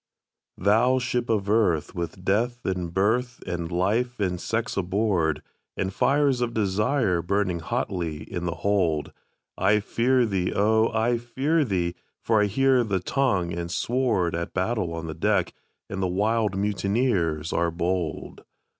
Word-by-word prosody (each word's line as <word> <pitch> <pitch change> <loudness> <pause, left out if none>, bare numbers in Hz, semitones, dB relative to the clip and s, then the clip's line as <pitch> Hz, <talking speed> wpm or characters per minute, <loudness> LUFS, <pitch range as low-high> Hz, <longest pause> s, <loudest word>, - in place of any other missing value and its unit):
"Thou 110 +7 +3
Ship 125 -1 -1
of 105 -3 0
Earth, 100 -8 +2
with 90 +1 -5
Death, 120 +5 0
and 90 -3 -2
Birth, 120 +6 0
and 85 -1 -4
Life, 110 +8 0
and 90 -3 -1
Sex 115 +2 -2
aboard, 95 -4 0 0.3
And 95 0 -2
fires 140 -1 +2
of 120 -1 -1
Desires 105 -2 +1
burning 95 -1 0
hotly 80 -1 -3
in 90 0 -5
the 85 - -2
hold, 90 -7 +1 0.5
I 105 +1 +4
fear 125 +4 +2
thee, 95 -4 -1
O! 110 +2 +3
I 115 +1 +1
fear 135 +7 0
thee, 90 -8 -1 0.3
for 110 -2 +2
I - - +4
hear 130 +4 +3
the 100 -4 -1
tongue 95 -5 0
and 85 0 -4
sword 115 -4 0
At 85 +1 -4
battle 95 -1 0
on 80 0 -5
the 80 - -4
deck, - - 0 0.3
and 100 -1 -4
the 95 - +1
wild 105 +2 0
mutineers 100 - 0
are 85 - +1
bold! 85 0 -3
100 Hz, 150 wpm, -25 LUFS, 90-120 Hz, 0.5 s, I